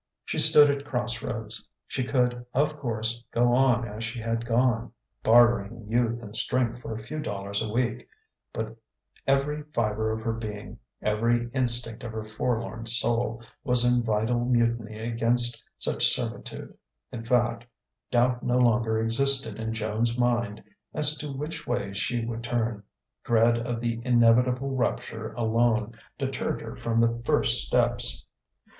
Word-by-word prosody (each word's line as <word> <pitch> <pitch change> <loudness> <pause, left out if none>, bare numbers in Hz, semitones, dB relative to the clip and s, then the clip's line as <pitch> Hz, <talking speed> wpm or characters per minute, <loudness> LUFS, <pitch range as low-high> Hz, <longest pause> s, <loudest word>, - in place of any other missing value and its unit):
She - - -2
stood 145 -1 +7
at 140 0 -4
crossroads. 120 -4 -4 0.2
She 130 - -3
could, 125 -1 0
of 150 +3 +1
course, 115 -2 -2
go 120 +1 +2
on 125 -2 +3
as 105 +1 -7
she 115 +2 -5
had 115 +1 -3
gone 120 0 +1 0.3
bartering 120 -1 +3
youth 120 +1 0
and 105 0 -7
strength 120 -1 +1
for 115 - -6
a 110 - -8
few 155 +8 -6
dollars 100 -7 -3
a 110 -2 -3
week. 120 +1 -1 0.4
But - - -5 0.5
every 140 +2 +1
fibre 110 -1 0
of 110 0 -3
her 115 0 -2
being, 105 -2 -7 0.2
every 115 +3 0
instinct 120 -3 -2
of 115 -2 -6
her 110 -1 -4
forlorn 115 +1 -3
soul, 115 0 0 0.2
was 125 -3 +4
in 125 0 +3
vital 115 +2 0
mutiny 115 -3 0
against 120 +1 +1
such - - +2
servitude. - - +2 0.4
In 115 - -6
fact, 120 -1 0 0.4
doubt 125 0 +2
no 125 0 0
longer 115 -2 +2
existed 115 0 +3
in 110 0 -3
Joan's 110 +2 -1
mind 120 -4 0 0.3
as 150 0 +2
to 150 -1 -5
which 150 +4 -6
way 120 -5 -2
she 115 +4 -1
would 115 0 -5
turn: 115 -3 -2 0.4
dread 115 0 +3
of 120 0 -3
the 115 -1 -2
inevitable 125 +2 +3
rupture 65 - -2
alone 115 -1 +1 0.2
deterred 135 -2 -3
her - - -8
from 115 -1 -2
the 115 0 +2
first - - +3
steps. - - 0
120 Hz, 150 wpm, -26 LUFS, 110-125 Hz, 0.5 s, stood